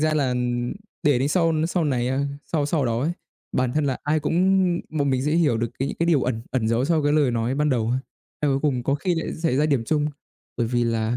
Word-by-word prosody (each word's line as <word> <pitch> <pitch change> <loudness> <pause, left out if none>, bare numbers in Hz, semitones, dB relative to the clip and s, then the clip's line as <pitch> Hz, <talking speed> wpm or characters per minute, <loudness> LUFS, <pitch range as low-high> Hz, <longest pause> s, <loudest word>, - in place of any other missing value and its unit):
ra 155 0 +2
là 135 -4 +1 0.7
để 145 -4 +3
đến 135 +3 +1
sau 165 0 +2
n 155 +1 +1
sau 175 -1 0
này, 125 -4 0
a 135 +2 0 0.3
sau 150 -3 +1
sau 150 -3 0
đó 115 -1 0
ấy, 160 +6 0 0.4
bản 125 -1 0
thân 155 -1 +1
là 135 -2 -1
ai 155 +1 +1
cũng 150 - -1 0.6
bọn 145 -3 0
mình 130 0 +1
sẽ 150 - +1
hiểu 150 -9 +3
được 115 0 -1
cái 135 +1 -1
những - - -5
cái 170 - 0
điều 155 -6 +3
ẩn 115 -3 -2
ẩn 120 -4 0
giấu 115 +3 +1
sau 160 -1 +2
cái 145 0 +2
lời 145 -4 +3
nói 120 +2 -1
ban 150 +1 +1
đầu 115 -3 +1
á. 130 - +1 0.4
Eo 150 - +2
ôi, 135 - +2
cuối 150 - +3
cùng 125 -2 -2
có 140 - +1
khi 175 +5 0
lại 165 - -3
xảy 160 -5 0
ra 150 +2 +3
điểm 135 -6 +1
chung 150 +3 +1 0.5
bởi 120 - 0
vì 120 0 +1
là 115 0 0
140 Hz, 275 wpm, -24 LUFS, 125-155 Hz, 0.7 s, để